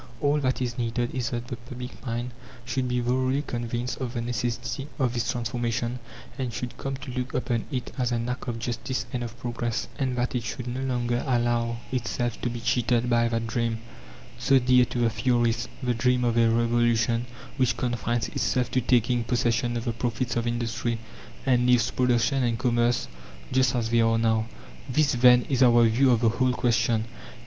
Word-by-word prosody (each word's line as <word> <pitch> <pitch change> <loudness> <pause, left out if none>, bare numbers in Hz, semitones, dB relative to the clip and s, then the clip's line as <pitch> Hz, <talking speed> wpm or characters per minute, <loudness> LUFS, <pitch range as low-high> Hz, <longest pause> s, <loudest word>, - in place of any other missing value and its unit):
All 145 +1 +2
that 130 -2 0
is 120 0 -3
needed 120 +1 -1
is 125 -2 -1
that 120 0 -3
the 120 - -5
public 125 +1 -9
mind 120 0 -3 0.3
should 130 +1 -1
be 125 0 0
thoroughly 130 +3 +1
convinced 120 0 -3
of 125 -1 -4
the 120 - -1
necessity 120 +2 -3
of 130 -4 +1
this 120 -1 0
transformation, 120 0 -2 0.4
and 130 -2 -2
should 120 +1 -5
come 135 -1 -3
to 135 -1 -8
look 125 +1 -4
upon 120 -2 -1
it 125 -3 -3
as 125 -1 +1
an 120 0 -1
act 125 +2 -4
of 120 -2 -2
justice 120 +3 -3
and 125 - -1
of 120 0 -7
progress, 120 -1 -2
and 130 -2 0
that 125 0 0
it 125 - 0
should 120 +2 -5
no 125 +1 -4
longer 120 -2 -1
allow 120 -2 +1
itself 120 -1 -2
to 125 - 0
be 120 0 -5
cheated 120 0 +1
by 115 0 +4
that 115 0 -1
dream, 115 0 -1 0.6
so 135 +2 +4
dear 125 0 +5
to - - -6
the 120 -1 +3
theorists 115 0 +1 0.2
the 125 -1 +1
dream 125 +1 +2
of 120 -1 +1
a 115 -1 +4
revolution 115 0 +2 0.3
which 130 -2 +2
confines 120 -1 -1
itself 125 -1 0
to 130 - +2
taking 120 0 +2
possession 120 0 0
of 115 - -4
the 115 - -1
profits 120 +1 -2
of 120 0 0
industry, 120 0 -1 0.5
and 125 -2 +3
leaves 125 -1 +4
production 125 +2 +2
and 120 -2 +1
commerce 120 -1 +1 0.4
just 130 0 +3
as 115 -2 -1
they 115 0 +4
are 115 0 +3
now. 110 -1 +1 0.4
This, 145 +3 +3
then, 125 0 +6
is 130 -2 0
our 120 -2 +6
view 120 +4 +4
of 120 -2 +3
the 115 - +4
whole 125 +2 +1
question. 115 -2 +1
120 Hz, 190 wpm, -26 LUFS, 115-125 Hz, 0.6 s, then